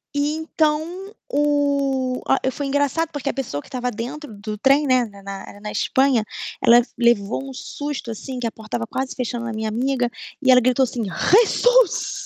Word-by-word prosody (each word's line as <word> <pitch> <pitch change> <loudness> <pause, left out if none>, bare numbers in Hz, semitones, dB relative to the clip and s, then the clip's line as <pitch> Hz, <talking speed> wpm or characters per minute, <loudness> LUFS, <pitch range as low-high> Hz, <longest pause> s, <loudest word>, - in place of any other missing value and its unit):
E 285 0 +2
então 310 -1 +1 0.5
o 280 -3 +1
a 270 - +4
e - - +2
foi 285 +1 -4
engraçado 285 +4 +1
porque 290 -2 -3
a - - -1
pessoa 235 - -4
que - - -18
estava 250 -2 -3
dentro 250 +5 -6
do 210 +1 -6
trem, 275 +5 +4
né, 255 -2 +3
na 200 -3 -13
na 195 +1 -8
na 210 0 -6
Espanha, 265 -4 +2 0.4
ela 240 +1 +7 0.2
levou 235 +2 +1
um - - -8
susto, 285 -2 -5
assim, 255 +4 -6
que 240 - -3
a 230 - -1
porta 220 +1 -5
estava 230 - -3
quase 260 +3 -3
fechando 240 -1 -3
na 235 - -4
minha 220 0 -2
amiga, 250 +2 0 0.3
e 260 -2 +5
ela 250 0 +7
gritou, 255 +2 +3
assim: 245 -2 -2
"Jesus!" 405 - +3
260 Hz, 190 wpm, -22 LUFS, 230-285 Hz, 0.5 s, ela